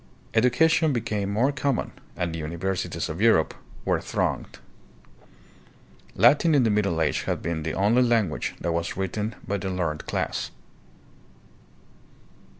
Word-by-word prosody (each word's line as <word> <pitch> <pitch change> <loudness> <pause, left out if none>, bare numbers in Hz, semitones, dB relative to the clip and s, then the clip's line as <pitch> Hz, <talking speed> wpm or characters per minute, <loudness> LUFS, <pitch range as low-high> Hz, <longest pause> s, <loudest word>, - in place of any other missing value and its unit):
Education 145 +7 +3
became 105 -4 -2
more 120 +7 +2
common, 140 -2 -1 0.2
and 85 -1 -2
the 85 - -4
universities 85 +4 -3
of 80 +5 -5
Europe 110 -9 +4 0.3
were - - +1
thronged. - - -2 1.6
Latin 155 +2 +5
in 135 - +5
the 110 - +2
Middle 100 -5 +1
Age 80 - +1
had - - -2
been 85 -1 -2
the 80 0 -3
only 105 +6 +3
language 115 -9 +1
that 85 - -1
was 85 +1 -2
written 105 +3 -2
by 100 +2 -1
the 95 0 -4
learned 80 -5 -2
class. - - -2
100 Hz, 135 wpm, -25 LUFS, 85-120 Hz, 1.6 s, Latin